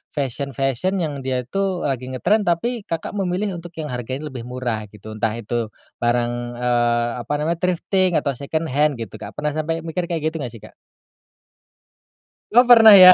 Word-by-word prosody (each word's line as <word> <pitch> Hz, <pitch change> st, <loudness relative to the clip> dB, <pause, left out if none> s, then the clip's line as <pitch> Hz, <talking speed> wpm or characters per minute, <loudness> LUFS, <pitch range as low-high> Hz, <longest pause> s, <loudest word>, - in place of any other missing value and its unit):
fashion-fashion 135 Hz, +4 st, -1 dB
yang 145 Hz, -3 st, -3 dB
dia 130 Hz, -1 st, -1 dB
tuh 195 Hz, +2 st, -1 dB
lagi 130 Hz, -2 st, -2 dB
ngetren 200 Hz, -, +2 dB
tapi 215 Hz, +7 st, 0 dB
Kakak 165 Hz, -1 st, -3 dB
memilih 190 Hz, 0 st, -1 dB
untuk 170 Hz, 0 st, -8 dB
yang 155 Hz, -, -3 dB
harganya 130 Hz, +4 st, -4 dB
lebih 125 Hz, -3 st, -6 dB
murah 125 Hz, -3 st, -2 dB
gitu 105 Hz, +1 st, -11 dB
entah 110 Hz, 0 st, 0 dB
itu, 115 Hz, +1 st, -2 dB, 0.4 s
barang, 120 Hz, 0 st, +2 dB, 0.3 s
eee, 120 Hz, -1 st, +2 dB, 0.2 s
apa 145 Hz, -, -3 dB
namanya 165 Hz, +3 st, -1 dB
thrifting 180 Hz, 0 st, +2 dB
atau 140 Hz, -, -1 dB
second 155 Hz, +5 st, -2 dB
hand 150 Hz, +1 st, +2 dB
gitu 115 Hz, -4 st, -6 dB
Kak 100 Hz, -, -7 dB
pernah 150 Hz, 0 st, -1 dB
sampai 160 Hz, +1 st, -1 dB
mikir 170 Hz, +2 st, -3 dB
kayak 160 Hz, -2 st, 0 dB
gitu 160 Hz, -, -5 dB
gak 125 Hz, -, -4 dB
sih, 115 Hz, -, -11 dB
Kak? -, -, -13 dB, 1.8 s
Oh 245 Hz, +2 st, +7 dB
pernah 225 Hz, -3 st, +10 dB
ya. 185 Hz, -2 st, +11 dB
150 Hz, 175 wpm, -22 LUFS, 125-175 Hz, 1.8 s, ya